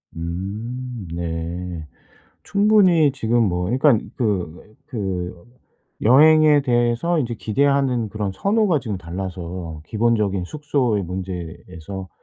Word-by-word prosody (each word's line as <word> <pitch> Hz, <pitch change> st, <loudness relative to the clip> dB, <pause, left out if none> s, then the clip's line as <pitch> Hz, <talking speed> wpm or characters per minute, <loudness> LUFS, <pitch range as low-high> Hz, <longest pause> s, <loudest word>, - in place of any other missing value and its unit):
음 105 Hz, +6 st, -5 dB
네. 85 Hz, 0 st, -4 dB, 0.6 s
충분히 200 Hz, -7 st, +4 dB
지금 120 Hz, -2 st, +1 dB
뭐 90 Hz, 0 st, -1 dB
그러니깐 125 Hz, +2 st, +2 dB
그 100 Hz, -3 st, -3 dB
그 95 Hz, -7 st, -3 dB, 0.7 s
여행에 150 Hz, +4 st, +6 dB
대해서 120 Hz, +7 st, +1 dB
인제 120 Hz, -4 st, -2 dB
기대하는 130 Hz, -1 st, +1 dB
그런 105 Hz, -2 st, -3 dB
선호가 200 Hz, -, +2 dB
지금 105 Hz, -6 st, -4 dB
달라서 90 Hz, -2 st, -6 dB
기본적인 105 Hz, -4 st, +1 dB
숙소의 130 Hz, -5 st, -1 dB
문제에서 90 Hz, 0 st, -7 dB
105 Hz, 230 characters per minute, -21 LUFS, 90-130 Hz, 0.7 s, 여행에